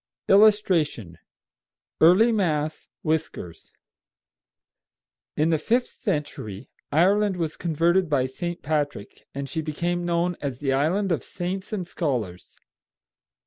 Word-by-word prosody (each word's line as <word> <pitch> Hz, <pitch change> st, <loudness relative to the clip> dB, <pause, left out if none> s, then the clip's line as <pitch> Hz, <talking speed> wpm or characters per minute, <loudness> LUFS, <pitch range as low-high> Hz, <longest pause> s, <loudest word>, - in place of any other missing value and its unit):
[Illustration: 180 Hz, -, +3 dB, 0.8 s
"EARLY 185 Hz, +9 st, +6 dB
MASS" 155 Hz, -7 st, -1 dB, 0.2 s
WHISKERS.] 155 Hz, -, -3 dB, 1.7 s
In 155 Hz, +2 st, +2 dB
the 160 Hz, -, +2 dB
fifth 240 Hz, +10 st, +1 dB, 0.2 s
century 145 Hz, -, -4 dB, 0.2 s
Ireland 195 Hz, +4 st, +3 dB
was 160 Hz, -3 st, -2 dB
converted 170 Hz, +2 st, +1 dB
by 135 Hz, -4 st, +2 dB
St. 170 Hz, +7 st, -5 dB
Patrick, 145 Hz, -8 st, -3 dB
and 140 Hz, 0 st, -4 dB
she 160 Hz, +3 st, -3 dB
became 170 Hz, +3 st, -2 dB
known 175 Hz, 0 st, 0 dB
as 135 Hz, -4 st, -3 dB
the 135 Hz, 0 st, -1 dB
Island 180 Hz, +8 st, +1 dB
of 165 Hz, -, 0 dB
Saints 185 Hz, +3 st, -5 dB
and 195 Hz, -5 st, -3 dB
Scholars. 120 Hz, -, -3 dB
165 Hz, 110 wpm, -25 LUFS, 145-185 Hz, 1.7 s, EARLY